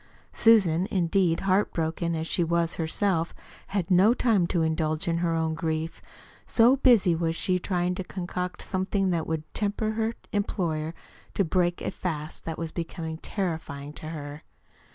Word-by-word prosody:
Susan, 190 -6 +4
indeed, 175 -2 +2
heart 195 +1 +2
broken 165 +1 -1
as 160 0 -2
she 175 - +1
was 170 0 0
herself, 165 +1 0 0.3
had 195 -2 -2
no 195 +6 +6
time 215 -9 +2
to 170 -2 +1
indulge 155 0 0
her 170 -1 0
own 160 -1 0
grief, 160 0 -3 0.5
so 240 +3 +5
busy 230 -10 +5
was 165 0 0
she 180 +1 0
trying 180 -1 0
to 185 - -4
concoct 180 0 -4
something 190 0 0
that 165 -2 -1
would 160 -1 -2
tempt 205 -1 -1
her 220 +1 0 0.2
employer 170 -6 -1 0.4
to 195 - +2
break 175 +1 +1
a - - -1
fast 155 -4 -5
that 165 - -4
was 165 -1 -4
becoming 160 -1 -5
terrifying 160 -8 -4
to 155 - -8
her. 145 -1 -7
170 Hz, 155 wpm, -27 LUFS, 160-195 Hz, 0.5 s, no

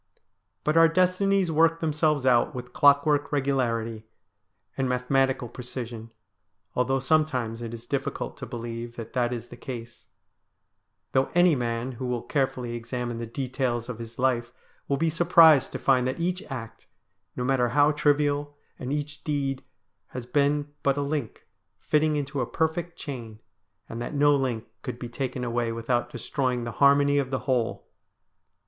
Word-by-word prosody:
But 155 +2 +1
our 165 0 +8
destinies 185 +1 +2
work 165 +1 +3
themselves 150 -3 +1
out 125 -1 +3
with 125 0 -7
clockwork 145 0 +4
regularity 115 -6 -1 0.7
and 135 -1 -1
mathematical 130 0 +1
precision, 120 -2 -7 0.7
although 130 +2 +2
sometimes 130 -5 0
it 115 -1 -5
is 115 0 -8
difficult 140 +2 -3
to - - -7
believe 120 0 -6
that 115 -2 -8
that 120 -1 +1
is 120 -1 -5
the - - -11
case; 120 -2 -8 1.0
though 130 0 +2
any 175 -1 +6
man 120 0 -2
who 125 +1 -5
will 125 -1 -2
care 135 -2 +1
fully 120 -2 -6
examine 120 0 -4
the 115 - -4
details 125 -1 -2
of 120 -2 -5
his 115 0 -9
life 120 -2 +1 0.4
will 140 - +1
be 160 +2 +1
surprised 165 -3 +6
to - - -2
find 130 -2 +2
that 130 - -3
each 180 +2 -1
act, 115 -4 -7 0.5
no 125 - -2
matter 125 -2 +2
how 145 +4 +4
trivial, 145 -1 +1 0.2
and 130 +1 -4
each 145 0 -4
deed, 140 -3 -2 0.4
has 125 -2 -7
been 145 +3 +1
but 140 0 +1
a 145 - 0
link 140 -5 -4 0.3
fitting 155 0 +2
into 140 -2 -2
a 120 - -1
perfect 160 +5 -2
chain, 120 -6 -7 0.5
and 115 - -6
that 120 - -4
no 145 0 +5
link 125 -5 -1 0.2
could - - -5
be 120 -1 -6
taken 130 0 -3
away 120 -1 -1
without 120 +1 -1
destroying 125 -1 -2
the 120 - -4
harmony 140 0 +5
of 135 -2 -1
the 130 -1 -2
whole. 125 -4 0
130 Hz, 160 wpm, -26 LUFS, 120-145 Hz, 1.0 s, our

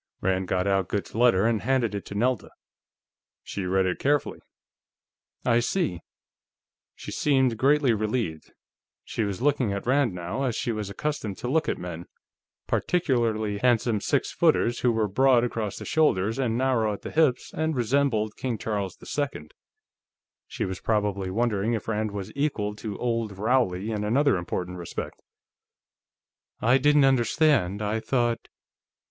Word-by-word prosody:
Rand 95 0 0
got 90 +1 0
out 95 -2 +1
Goode's 100 - -3
letter 115 -4 +4
and 115 -2 +1
handed 125 -3 +1
it 100 - -4
to 100 - -7
Nelda. 120 +1 0 0.9
She 95 - -5
read 95 +1 +2
it 90 -1 -1
carefully. 145 0 0 1.1
"I 120 -1 +4
see." 120 - -1 1.0
She - - -8
seemed 130 -5 +2
greatly 135 +1 +3
relieved; 105 -6 -2 0.5
she 115 - -3
was 100 +2 -3
looking 140 -7 +2
at 100 - -4
Rand, 130 -5 +2
now, 90 +9 -4
as 125 -4 0
she 120 - -1
was 105 -3 -4
accustomed 110 -2 -3
to - - -5
look 155 +5 +1
at - - -1
men, 85 -1 -7 0.6
particularly 115 - 0
handsome 115 -3 +2
six - - 0
footers 120 +1 +2
who 125 - +2
were 110 -2 +1
broad 125 +4 +4
across 110 -4 -3
the - - -7
shoulders 115 -7 +1
and 120 -3 0
narrow 120 -5 +1
at 100 - -9
the - - -6
hips 150 -6 +1
and 160 -1 -1
resembled 120 -3 +1
King 125 -4 -2
Charles 100 -4 -3
II. 140 - -3 1.0
She - - -3
was 95 -1 -4
probably 105 -3 0
wondering 110 +1 0
if 110 - -3
Rand 110 -1 -1
was 100 0 -6
equal 135 -8 -1
to 105 -2 -5
Old 115 -4 -2
Rowley 110 -3 +1
in 105 -1 -2
another 135 +6 +3
important 90 +1 -4
respect. 85 - -6 1.4
"I 125 +4 +4
didn't 145 +1 +5
understand... 130 - +2
I 105 +2 0
thought...." 120 -1 -1
115 Hz, 155 wpm, -26 LUFS, 100-130 Hz, 1.4 s, didn't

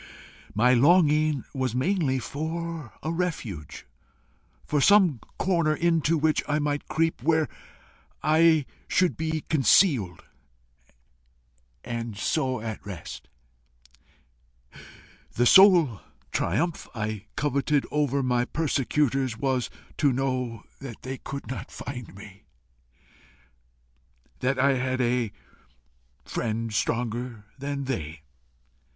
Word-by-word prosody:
My 125 +4 +4
longing 150 +1 +4
was 130 -4 -2
mainly 145 -1 +1
for 160 0 -4
a 160 - -1
refuge, 115 - -4 0.8
for 150 -2 0
some 185 - +5 0.2
corner 170 -5 +1
into 165 -1 +2
which 155 0 +2
I 150 - +1
might 145 -1 -2
creep, 165 -4 0
where 160 +2 +2 0.8
I 160 0 +4 0.2
should 185 -2 +2
be 160 0 -2
concealed 135 - +3 1.6
and 115 -3 -5
so 130 +1 0
at 110 -1 -5
rest. 90 -6 -8 2.0
The 120 - +2
sole 170 - +6 0.3
triumph 155 - -1
I 110 -2 -4
coveted 145 0 +1
over 140 -2 +1
my 125 -1 +1
persecutors 135 -4 0
was 130 -2 0 0.3
to 145 -2 +4
know 125 -4 -2 0.2
that 130 -5 -9
they 130 0 -5
could 140 0 -7
not 130 - -6
find 125 -7 -8
me 100 -1 -13 1.9
that 130 +1 0
I 135 0 +3
had 130 0 -1
a 120 -3 +1 0.9
friend 115 0 -3
stronger 115 0 -2
than 140 0 -3
they. 80 - -4
135 Hz, 100 wpm, -26 LUFS, 120-155 Hz, 2.0 s, sole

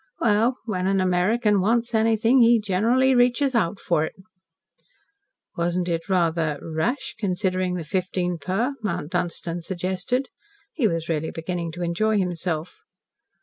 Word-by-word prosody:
"Well, 230 +3 +2
when 185 -5 -1
an 195 0 +2
American 195 +3 +2
wants 235 +4 +1
anything 225 +3 +3
he 235 0 +6
generally 230 +7 +2
reaches 250 +2 +3
out 205 -4 0
for 165 -3 +1
it." 160 - -5 1.4
"Wasn't 175 +1 -1
it 165 +2 -2
rather 165 -4 +1
rash, 165 - -2
considering 185 -2 -1
the 175 - -4
fifteen 180 +1 -2
per?" 195 - -1
Mount 180 -6 -3
Dunstan 170 0 -2
suggested. 190 +9 -2 0.4
He 255 -8 +2
was 165 -3 -2
really 160 -1 -1
beginning 170 0 -4
to 175 +1 -5
enjoy 215 +6 +1
himself. 175 -3 -2
185 Hz, 135 wpm, -24 LUFS, 170-225 Hz, 1.4 s, he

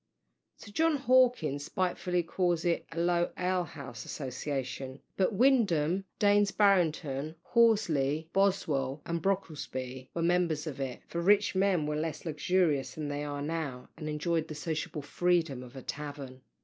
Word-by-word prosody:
Sir 205 - -12
John 325 +6 +2
Hawkins 245 - +3
spitefully 180 -1 -1
calls 175 0 0
it 170 -1 0
"a 165 - -9
low 175 0 +2
ale 180 0 +1
house 135 -7 -8
association;" 135 -1 -4 0.2
but 190 +2 +2
Windham, 195 - +3
Daines 205 0 +4
Barrington, 160 -7 +2
Horsley, 165 - +2
Boswell, 150 -8 +1
and 170 0 -2
Brocklesby 130 -9 -3
were 170 - 0
members 170 -3 +1
of 145 -4 -5
it; 130 -2 -4
for 170 - -3
rich 205 +3 +4
men 190 -4 +2
were 150 0 -1
less 155 +1 -3
luxurious 155 -2 +1
than 150 -2 -4
they 145 0 -3
are 145 -1 -4
now, 150 -5 -4
and 155 -1 -5
enjoyed 155 +2 -1
the 155 - -7
sociable 155 0 -3
freedom 165 -4 +1
of 125 +1 -12
a 130 - -8
tavern. 140 -3 -6
160 Hz, 150 wpm, -30 LUFS, 145-185 Hz, 0.2 s, Daines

